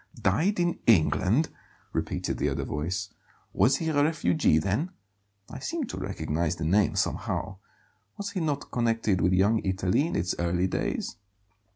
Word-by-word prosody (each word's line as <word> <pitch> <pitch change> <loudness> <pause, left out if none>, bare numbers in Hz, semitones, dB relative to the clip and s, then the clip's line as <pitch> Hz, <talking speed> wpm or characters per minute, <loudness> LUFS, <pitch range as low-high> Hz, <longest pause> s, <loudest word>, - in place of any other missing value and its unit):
"Died 175 - +1
in 175 -1 +1
England!" 110 - +4 0.4
repeated - - -2
the - - +1
other - - -2
voice. 90 +7 -3 0.4
"Was 135 - +4
he 165 - -2
a 145 -2 +3
refugee, 90 - +2
then? 100 - 0 0.6
I - - -8
seem 330 -2 -3
to 245 - -6
recognize 80 -3 -2
the 80 -1 -4
name, 100 +5 +3
somehow; 95 - -2 0.6
was 200 0 -4
he 195 - -3
not 145 -4 -2
connected 115 -5 +1
with 90 - +3
Young 100 +5 +4
Italy 95 - +1
in - - -3
its 90 +1 0
early 85 +1 +1
days?" 95 - -2
100 Hz, 155 wpm, -27 LUFS, 90-150 Hz, 0.6 s, England